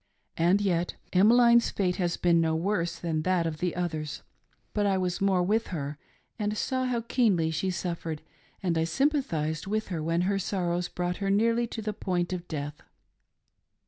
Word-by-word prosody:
And 175 +5 +3
yet 175 -3 0 0.2
Emmeline's 235 +5 +6
fate 180 -3 0
has 175 -2 0
been 170 -1 +3
no 160 -1 +1
worse 170 -1 -1
than 165 -2 -1
that 180 0 +1
of 155 -2 -3
the 180 0 -1
others; 155 -4 -3 0.5
but 205 -1 +1
I 195 -1 +2
was 180 0 -1
more 190 -2 +3
with 220 +5 +1
her, 145 -4 -4 0.4
and 210 0 -1
saw 260 +2 0
how 245 -2 0
keenly 210 -9 +2
she 170 +4 -1
suffered, 170 -3 -3 0.4
and 170 -3 +1
I - - +2
sympathised 165 - 0
with 215 +1 -1
her 170 -4 -2
when 165 +2 0
her 195 +2 +1
sorrows 180 -2 -1
brought 180 0 -3
her 195 -1 -2
nearly 230 +4 +2
to 225 -1 -6
the 215 0 -2
point 180 -2 -1
of 175 -1 -5
death. 150 -1 -5
180 Hz, 175 wpm, -28 LUFS, 165-205 Hz, 0.5 s, Emmeline's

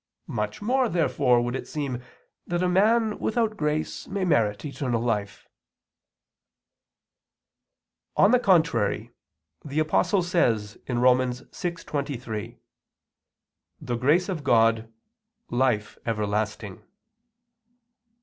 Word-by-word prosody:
Much 105 - -3
more, 255 +2 +2
therefore, 145 -7 +2
would 120 +1 -2
it - - -5
seem 140 -5 -4 0.5
that 175 +1 -1
a - - +2
man 215 +4 +2
without 220 -1 0
grace 150 -3 -2
may 195 -1 -2
merit 105 - +1
eternal 130 -4 -2
life. 105 -4 -2 2.7
On 200 - +6
the 250 - +5
contrary, 120 - +2 0.5
The 145 0 -6
Apostle 165 +5 +2
says 115 - 0
(Rom. 125 +1 +4
6:23): 130 - -4 1.2
"The 120 - -3
grace 150 +10 +2
of 175 -7 -4
God, 115 -3 +3 0.6
life 120 -4 0
everlasting." 105 -2 -2
130 Hz, 95 wpm, -25 LUFS, 115-175 Hz, 2.7 s, On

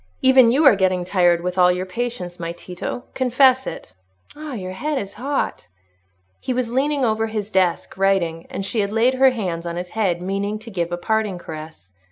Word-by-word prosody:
Even 260 -3 +6
you 290 +5 +3
are 260 - +8
getting 185 -2 +1
tired, 175 -2 +3
with 180 +1 -3
all 180 0 +6
your 180 +1 -2
patience, 185 -3 -5
my 170 0 -4
Tito; 180 +7 -6
confess 260 0 +3
it. - - -7 0.4
Ah, 300 -1 -7
your 185 -5 -5
head 295 +10 -2
is 200 -4 -4
hot." 280 +1 -2 0.7
He 255 - -2
was 245 -2 -1
leaning 280 +1 +1
over 220 0 0
his 215 -1 -4
desk, 185 -3 0
writing, 175 -4 +1
and 195 - -4
she 220 - -2
had 200 -1 0
laid 230 +4 +3
her 265 +1 +5
hand 180 -9 -3
on 170 - -4
his 180 +1 -5
head, 190 -5 0
meaning 200 +3 -2
to 225 +2 -11
give 175 -3 -2
a 175 - -2
parting 215 0 -1
caress. 155 - -10
200 Hz, 200 wpm, -21 LUFS, 180-245 Hz, 0.7 s, are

